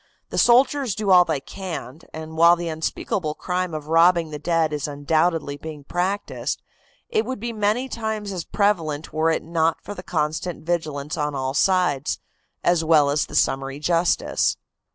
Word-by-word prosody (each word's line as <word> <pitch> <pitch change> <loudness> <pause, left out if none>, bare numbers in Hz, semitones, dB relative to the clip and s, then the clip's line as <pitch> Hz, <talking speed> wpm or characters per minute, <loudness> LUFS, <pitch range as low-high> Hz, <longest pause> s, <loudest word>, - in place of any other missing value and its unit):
The - - 0
soldiers 255 -1 +4
do 210 -2 0
all 180 -1 +8
they 160 -4 -1
can, 160 -5 -7
and 160 0 -8
while 170 +1 +6
the 170 -1 -4
unspeakable 155 0 -2
crime 180 -2 -2
of 150 -1 -5
robbing 165 0 +4
the 150 - -5
dead 165 0 +1
is 150 -1 -2
undoubtedly 150 +1 0
being 150 -1 -8
practiced, 180 +6 -2 0.5
it 440 -2 +1
would 260 -3 -5
be 235 +2 -4
many 215 +4 0
times 220 -4 -3
as 180 -3 -4
prevalent 165 -8 0
were 160 +1 +2
it 165 - 0
not 165 0 0
for 205 - -6
the 180 - -8
constant 155 0 -2
vigilance 155 -3 -2
on 150 -1 -1
all 130 0 -2
sides, 155 -3 +2 0.5
as 175 -2 +3
well 155 -3 +4
as 145 +1 0
the - - -8
summary 135 +1 +1
justice." 170 +3 +1
165 Hz, 170 wpm, -23 LUFS, 150-185 Hz, 0.5 s, all